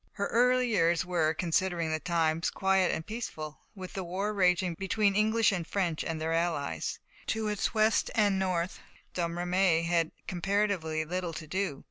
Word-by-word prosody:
Her 200 Hz, -, -2 dB
early 250 Hz, +1 st, +3 dB
years 175 Hz, -5 st, +2 dB
were, 165 Hz, -3 st, +1 dB
considering 170 Hz, -1 st, 0 dB
the 155 Hz, -, 0 dB
times, 165 Hz, -1 st, +1 dB
quiet 190 Hz, -1 st, +2 dB
and 160 Hz, -, -3 dB
peaceful. 155 Hz, -, -6 dB, 0.2 s
With 185 Hz, -2 st, -8 dB
the 190 Hz, -, -3 dB
war 190 Hz, +4 st, -2 dB
raging 180 Hz, -2 st, +2 dB
between 195 Hz, +3 st, +1 dB
English 220 Hz, +1 st, +3 dB
and 175 Hz, -4 st, -3 dB
French 175 Hz, -6 st, -1 dB
and 160 Hz, -1 st, -3 dB
their 160 Hz, +1 st, -1 dB
allies, 165 Hz, -4 st, -1 dB, 0.3 s
to 220 Hz, -1 st, -1 dB
its 210 Hz, +1 st, -1 dB
west 215 Hz, +1 st, +3 dB
and 205 Hz, -3 st, +3 dB
north, 185 Hz, -2 st, -1 dB, 0.3 s
Domremy 175 Hz, 0 st, +1 dB
had 170 Hz, -1 st, +1 dB, 0.2 s
comparatively 180 Hz, -4 st, 0 dB
little 175 Hz, +1 st, -3 dB
to 160 Hz, 0 st, -6 dB
do. 185 Hz, -3 st, -2 dB
180 Hz, 160 wpm, -30 LUFS, 165-200 Hz, 0.3 s, early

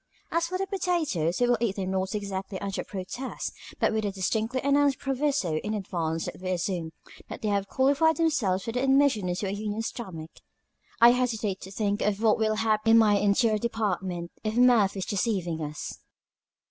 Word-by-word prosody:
As 335 Hz, 0 st, +1 dB
for 370 Hz, +1 st, -2 dB
the 390 Hz, -, -1 dB
potatoes, 335 Hz, -, -1 dB
we 245 Hz, -, +3 dB
will 240 Hz, -2 st, +2 dB
eat 220 Hz, -5 st, 0 dB
them 190 Hz, -2 st, -3 dB
not 190 Hz, +1 st, -1 dB
exactly 195 Hz, -1 st, -4 dB
under 195 Hz, -1 st, -3 dB
protest, 205 Hz, +7 st, -5 dB, 0.3 s
but -, -, +2 dB
with 220 Hz, 0 st, 0 dB
a 205 Hz, -, 0 dB
distinctly 220 Hz, +6 st, -1 dB
announced 280 Hz, -1 st, +3 dB
proviso 270 Hz, -, 0 dB
in 210 Hz, +6 st, -3 dB
advance 165 Hz, -5 st, -2 dB
that -, -, -7 dB
we 185 Hz, -, -3 dB
assume 175 Hz, -2 st, -2 dB, 0.4 s
that -, -, -8 dB
they 215 Hz, -, +1 dB
have 200 Hz, -1 st, 0 dB
qualified 285 Hz, +7 st, +3 dB
themselves 250 Hz, -, +1 dB
for 230 Hz, -, -3 dB
admission 265 Hz, -5 st, +2 dB
into 180 Hz, +3 st, -2 dB
a 190 Hz, -, -2 dB
union 210 Hz, +2 st, -3 dB
stomach. 175 Hz, -9 st, -6 dB, 0.7 s
I 235 Hz, +1 st, +8 dB
hesitate 225 Hz, -6 st, -1 dB
to 190 Hz, -, -9 dB
think 205 Hz, 0 st, -1 dB
of 205 Hz, -1 st, 0 dB
what 220 Hz, -1 st, +3 dB
will 215 Hz, -1 st, +1 dB
happen 215 Hz, 0 st, +1 dB
in -, -, +8 dB
my 215 Hz, -2 st, +5 dB
interior 215 Hz, +2 st, +2 dB
department 190 Hz, -6 st, -2 dB
if 215 Hz, 0 st, -2 dB
Murphy 235 Hz, -6 st, +4 dB
is -, -, -2 dB
deceiving 185 Hz, -6 st, -1 dB
us." 150 Hz, 0 st, -6 dB
210 Hz, 185 wpm, -27 LUFS, 190-245 Hz, 0.7 s, I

